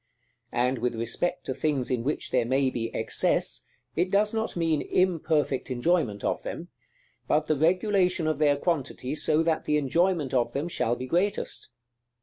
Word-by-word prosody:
And 125 +1 +1
with 120 0 -1
respect 120 +11 -2
to 130 - -2
things 135 -1 -1
in 120 -2 0
which 150 +4 -2
there 125 - +3
may 130 +2 +1
be 115 -2 -2
excess, 110 - 0 0.3
it 175 +3 +1
does 210 +3 +2
not 220 -4 -2
mean 165 -3 +1
imperfect 160 -7 +1
enjoyment 125 - 0
of - - -1
them; - - -6 0.6
but 150 +1 +2
the 155 - +1
regulation 180 +2 +2
of 155 -2 0
their 145 -2 +4
quantity, 140 -5 -2
so 155 +1 +2
that 165 -1 0
the 150 - +2
enjoyment 155 0 +1
of 120 -2 +1
them 145 +4 -2
shall 120 -7 0
be 130 - -5
greatest. 185 +9 -1
150 Hz, 165 wpm, -27 LUFS, 130-175 Hz, 0.6 s, their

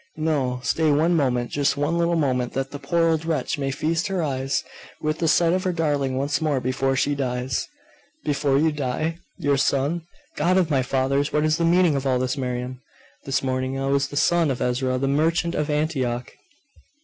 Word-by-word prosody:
No; 140 -6 0
stay 160 +3 +2
one 160 +4 +3
moment 125 -5 0
just 145 0 +1
one 150 +4 0
little 170 0 +2
moment 130 -6 0
that 135 0 -2
the 145 - -6
poor 165 +4 +1
old 160 -1 +1
wretch 160 -1 -1
may 135 -1 -1
feast 160 +6 -1
her 190 -3 -1
eyes 135 -2 -1 0.4
with 155 0 -2
the 165 - +1
sight 170 +1 +4
of 185 0 0
her 185 - +1
darling 145 -6 0
once 145 +2 0
more 150 -4 +1
before 135 +1 0
she 145 +2 +1
dies!' 125 -2 -2 0.6
'Before 140 -1 +1
you 160 +2 +3
die? 150 +4 -2 0.2
Your 140 -1 +1
son? 140 +5 +1 0.4
God 175 +5 +2
of 175 -4 +2
my 135 -2 +3
fathers, 135 +2 0
what 150 - +1
is 155 0 +2
the 170 - +1
meaning 170 -2 +4
of 135 0 -1
all 130 -1 +2
this, 130 +1 -1
Miriam? 125 -1 -4 0.4
This 135 0 0
morning 130 0 -1
I 135 - -2
was 140 0 +2
the 145 - -6
son 170 0 +3
of 130 - -2
Ezra 130 +1 0
the 135 +2 -1
merchant 165 +4 +1
of 150 -1 -1
Antioch! 135 -5 -1
145 Hz, 200 wpm, -23 LUFS, 130-160 Hz, 0.6 s, sight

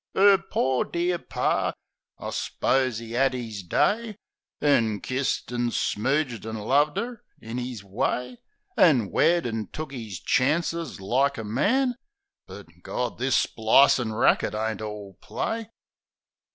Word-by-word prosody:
'Er 195 0 +7
"pore 130 -8 0
dear 175 0 -1
Par"... - - -1 0.4
I - - -6
s'pose 130 -4 0
'e 115 0 -7
'ad 135 +1 +2
'is 115 -5 -5
day, 210 - 0 0.4
An' 115 -8 +2
kissed 130 +3 -2
an' 120 0 0
smooged 130 +2 -1
an' 110 0 -5
loved 140 +8 +2
'er 235 -1 -4 0.2
in 115 +3 -5
'is 125 -4 -5
way. 125 +5 -2 0.4
An' 125 - +4
wed 170 -2 +3
an' 110 -3 -3
took 155 -2 -6
'is 110 -9 -6
chances 165 - 0
like 135 +8 +1
a 110 - -4
man 245 - +1 0.2
— 400 0 -62
But, - - -10 0.2
Gawd, 125 -1 -3
this 130 +1 +2
splicin' 110 +1 +4
racket 110 -1 +2
ain't 110 -1 -2
all 105 -3 -7
play. 225 -1 -3
125 Hz, 140 wpm, -25 LUFS, 110-155 Hz, 0.4 s, Er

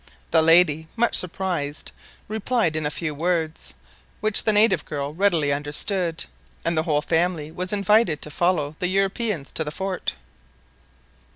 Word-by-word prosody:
The - - +5
lady, 160 -1 +5
much 235 0 +1
surprised, 170 -5 -1 0.4
replied 220 -5 -1
in 155 -1 -1
a - - -1
few 155 0 -3
words, 160 0 -2 0.4
which 215 -1 +5
the 215 - +4
native 210 -6 +4
girl 145 0 -5
readily 165 -6 +1
understood, 165 +4 -1 0.4
and 170 0 +1
the 155 - +2
whole 150 -1 +1
family 165 -2 -1
was 180 +2 -5
invited 205 -5 +2
to 150 - -8
follow 155 -3 0
the 180 - 0
Europeans 195 - -1
to 160 - -2
the 150 - -5
fort. 190 +4 -4
170 Hz, 150 wpm, -23 LUFS, 150-195 Hz, 0.4 s, The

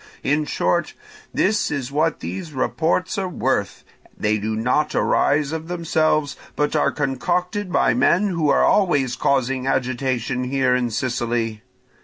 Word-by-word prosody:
In 150 +2 +1
short, 170 +2 0 0.4
this 215 +2 +1
is 140 -3 -3
what 155 +3 0
these 95 - -6
reports 165 +7 0
are 190 -1 -2
worth; 130 - -1 0.3
they 105 +1 0
do 110 +2 -2
not 125 +7 0
arise 145 0 +2
of 160 0 -4
themselves, 155 -4 0 0.2
but 150 +1 0
are 150 - +2
concocted 180 - -2
by - - +3
men 200 +4 +3
who 165 -5 0
are - - +4
always 145 -11 +2
causing 135 -1 0
agitation 130 -1 -1
here 130 -1 +1
in 125 -1 +1
Sicily. 115 -2 -2
140 Hz, 140 wpm, -21 LUFS, 125-160 Hz, 0.4 s, are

